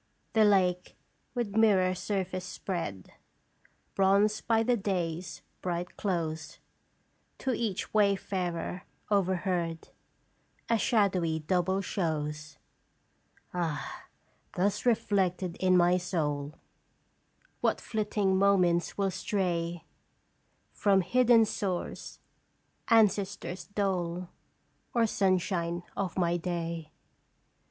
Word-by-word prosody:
" - - -43
The 220 -1 +5
lake, 180 -3 +2 0.4
with 230 -5 -2
mirror 195 -5 +4
surface 185 -1 -3
spread, 175 - -5 0.8
Bronzed 200 +2 +2
by 225 -1 +3
the 245 +2 +3
day's 180 -5 -3 0.2
bright 175 0 -3
close, 165 -5 -3 0.8
To 260 - -1
each 220 -4 -2
wayfarer 190 -4 0 0.3
overhead, 180 -4 0 0.8
A 230 - +3
shadowy 190 -9 +2
double 180 +4 0
shows. 155 -5 -3 1.0
"Ah! 165 -5 -3 0.5
thus 200 +6 0
reflected 190 -6 +1
in 185 -1 +4
my 175 +1 +4
soul 155 -5 -2 1.0
What - - +1
flitting 205 -3 0
thoughts 180 -4 +3
will 195 -1 +1
stray 175 -4 -2 0.9
From 195 -2 +3
hidden 235 +4 +5
source 190 -4 -4 0.7
ancestors' 200 -4 +2
dole, 180 -4 -2 0.7
Or 235 -1 +4
sunshine 180 -4 0
of 195 -3 -3
my 175 -1 +2
day. 170 -2 -4
185 Hz, 90 wpm, -29 LUFS, 170-200 Hz, 1.0 s, The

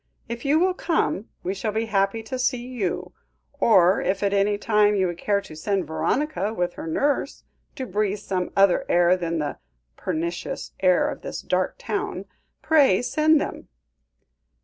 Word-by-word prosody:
If 235 +2 -6
you 285 +3 +4
will 365 +3 +3
come, 325 - -1
we 185 - -1
shall 205 +2 -3
be 220 +1 0
happy 200 +1 0
to 255 +4 -5
see 250 -1 0
you; 185 -7 -3 0.5
or 190 -7 +5
if 190 +2 -1
at 200 0 +1
any 200 +1 +2
time 210 -1 +3
you 190 -2 +2
would 175 -1 -3
care 200 -1 +1
to 155 - -12
send 190 +3 -1
Veronica 200 - -1
with 175 -2 -1
her - - -7
nurse, 275 - -1 0.3
to 265 -3 -4
breathe 210 -1 -1
some 185 -3 -3
other 195 -2 +4
air 175 +1 +4
than 170 -2 -2
the 150 -2 -3 0.4
pernicious 170 +2 -4
air 185 +9 +3
of 290 -2 -5
this - - -6
dark - - 0
town, 410 0 -3 0.4
pray 280 -10 +4
send 305 +5 +3
them." - - -5
205 Hz, 170 wpm, -24 LUFS, 180-250 Hz, 0.5 s, or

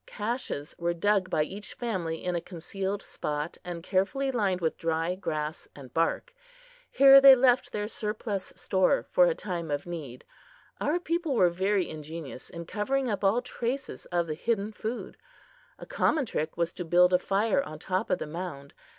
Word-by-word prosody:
Caches 210 - -4
were 170 0 0
dug 195 +1 +2
by 155 -4 +2
each 200 +6 -8
family 180 -9 -3
in 180 - -1
a 170 - -1
concealed 190 +3 -4
spot, 150 +2 -4
and 175 -2 -6
carefully 210 +10 0
lined 200 -7 0
with 160 -3 0
dry 165 +1 -1
grass 155 -4 -4
and 130 -4 -12
bark. 165 0 0 0.6
Here 275 0 +8
they 270 -1 +10
left 250 -1 +3
their 210 0 -2
surplus 210 -2 -4
stores 190 +9 +1
for - - +6
a - - +1
time 175 - -4
of 145 -1 -2
need. 150 -8 -7 0.5
Our 320 +4 +1
people 335 -4 -1
were 180 -6 +4
very 190 +1 +1
ingenious 155 -3 -8
in 170 0 -7
covering 250 +7 -1
up 205 - -3
all 215 +6 +3
traces 250 +2 -4
of 175 -1 0
the 155 - -3
hidden 210 +5 -1
food. 220 +3 -5 0.6
A - - -10
common 305 -4 +1
trick 155 -7 -3
was 170 0 0
to 180 - -5
build 180 +2 +4
a 180 - +5
fire 210 +8 +1
on 155 - -7
top 185 +6 -2
of 185 - +2
the - - -5
mound. 150 -4 -7
185 Hz, 175 wpm, -28 LUFS, 165-230 Hz, 0.6 s, they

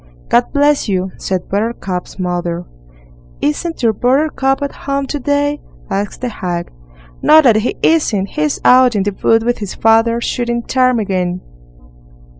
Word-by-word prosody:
"God 240 +1 +4
bless 290 -4 +2
you!" 185 -1 -1
said 185 -2 -3
Buttercup's 200 -3 -3
mother. 175 -2 -3 0.7
"Isn't 325 - -2
your 225 -2 +3
Buttercup 270 +3 +1
at 280 - -2
home 275 0 -3
to 290 +2 -4
day?" 290 +2 0 0.3
asked 200 +1 -3
the 250 - -2
hag. 175 -5 -4 0.5
"No, 310 - +7
that 245 -8 +5
he 220 +3 -1
isn't. 215 -12 +2
He's 300 -1 -1
out 250 -2 +6
in 200 - +1
the 205 0 -2
wood 225 0 +4
with 240 +1 -1
his 205 -3 -5
father, 225 +1 +3
shooting 235 0 -2
ptarmigan." 200 -9 0
235 Hz, 145 wpm, -16 LUFS, 195-270 Hz, 0.7 s, No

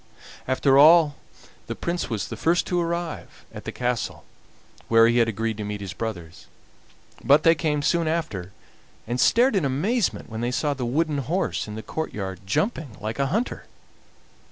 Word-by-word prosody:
After 135 +1 +3
all 155 0 +6 0.5
the - - -4
Prince 170 -3 -3
was 105 -5 -2
the - - -5
first 170 +2 +1
to 180 -1 0
arrive 170 -1 -4
at - - -9
the - - -4
castle 125 -2 -3 0.6
where 115 0 +6
he 120 +1 +3
had 115 - +4
agreed 110 0 -2
to 105 - -4
meet 105 0 -4
his 95 -3 -6
brothers, 85 -8 -6 0.8
but 145 +2 +5
they 165 - +6
came 150 -3 -1
soon 170 +1 +1
after, 155 - -3 0.5
and 120 +2 -3
stared 240 - +4
in 190 - +2
amazement 175 - 0
when 110 0 -6
they 120 - 0
saw 145 +4 0
the 125 -3 -4
wooden 150 +3 0
horse 165 +4 -2
in 105 - -7
the 110 - -7
courtyard 100 -12 -5
jumping 160 - -1
like 110 +5 -5
a 140 - +2
hunter. 220 - -2
140 Hz, 175 wpm, -24 LUFS, 110-165 Hz, 0.8 s, all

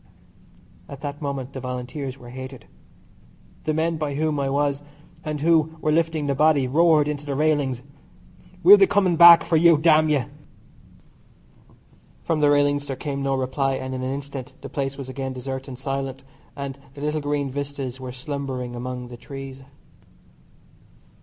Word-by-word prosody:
At 140 -1 -9
that 145 0 -6
moment 140 -2 -4
the 130 - -5
Volunteers 125 +2 -5
were 120 -2 -12
hated. 130 -2 -9 1.0
The 155 - +1
men 165 +1 0
by 150 -2 -3
whom 155 0 0
I 135 -1 0
was 140 0 0 0.4
and 150 -2 -4
who 160 0 +2
were 155 - 0
lifting 160 -1 +1
the 140 - +1
body, 145 -2 +3
roared 155 +1 +4
into 150 -1 -3
the 145 -2 -3
railings: 145 -4 +1 0.8
"We'll 405 +2 +10
be 390 - +5
coming 190 - +2
back 170 0 +9
for 165 - +2
you, 165 0 +6
damn 155 0 +4
you." 145 -5 +1 2.0
From 165 -2 0
the 150 -1 +4
railings 145 0 +2
there 135 - -3
came 140 0 -4
no 135 0 0
reply, 135 +1 -1
and 130 0 -5
in 130 - -4
an 130 +1 -2
instant 140 -2 -6
the - - -8
place 135 -1 -3
was 135 -2 -7
again 130 0 -4
desert 130 +1 -6
and 130 -2 -8
silent, 135 0 -4 0.3
and 140 -1 -6 0.2
the 140 - -9
little 150 +1 -1
green 145 -1 -1
vistas 140 -2 -5
were 130 -1 -6
slumbering 130 -2 -5
among 125 0 -5
the 120 - -9
trees. 135 +1 -9
140 Hz, 165 wpm, -23 LUFS, 130-150 Hz, 2.0 s, We'll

